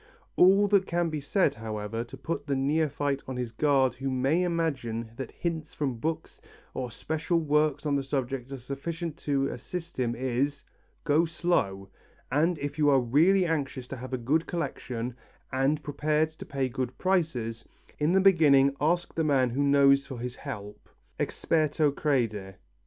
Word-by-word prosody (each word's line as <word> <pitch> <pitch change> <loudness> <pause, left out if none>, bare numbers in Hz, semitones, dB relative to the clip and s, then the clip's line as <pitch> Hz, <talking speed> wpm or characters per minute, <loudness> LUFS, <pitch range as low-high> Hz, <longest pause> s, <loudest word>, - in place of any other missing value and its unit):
All 195 +3 +6
that 195 -2 +3
can 170 -1 0
be 155 -1 -3
said, 185 +7 +2
however, 110 0 -4
to 120 - -11
put 150 -3 -4
the 140 - +1
neophyte 145 0 0
on 130 -1 -4
his 125 -2 -3
guard 135 0 +2
who 135 +2 -4
may 135 +6 +1
imagine 135 -10 -1
that 130 - -5
hints 160 -3 -4
from 135 -6 -2
books 160 +5 -4 0.3
or 125 -1 -3
special 160 +7 -1
works 150 -1 +1
on 145 -1 +1
the 140 - +1
subject 135 -1 -3
are 135 - -4
sufficient 150 +6 -5
to 140 -4 0
assist 170 -4 -6
him, 120 -2 0
is: 130 +3 -1 0.4
Go 155 +2 +3
slow, 115 - -1 0.4
and 160 +5 +2
if 145 +1 -5
you 145 -1 +4
are 135 -2 +5
really 165 +10 +4
anxious 140 -6 -2
to 135 - -5
have 130 +2 -8
a 130 - -1
good 145 +7 0
collection 125 -8 -4 0.4
and 140 +3 +1
prepared 150 +2 0
to 160 - -11
pay 135 -2 -1
good 125 0 -4
prices, 155 -12 0 0.4
in 150 +4 +2
the 190 - +5
beginning 145 -8 +5
ask 175 +4 +1
the 160 - 0
man 135 -5 +2
who 135 +4 -1
knows 140 -1 +4
for 135 -3 -6
his 125 +1 -5
help 105 -1 -8 0.3
Experto 155 -2 +1
crede. 110 -10 -1
140 Hz, 170 wpm, -28 LUFS, 130-160 Hz, 0.4 s, All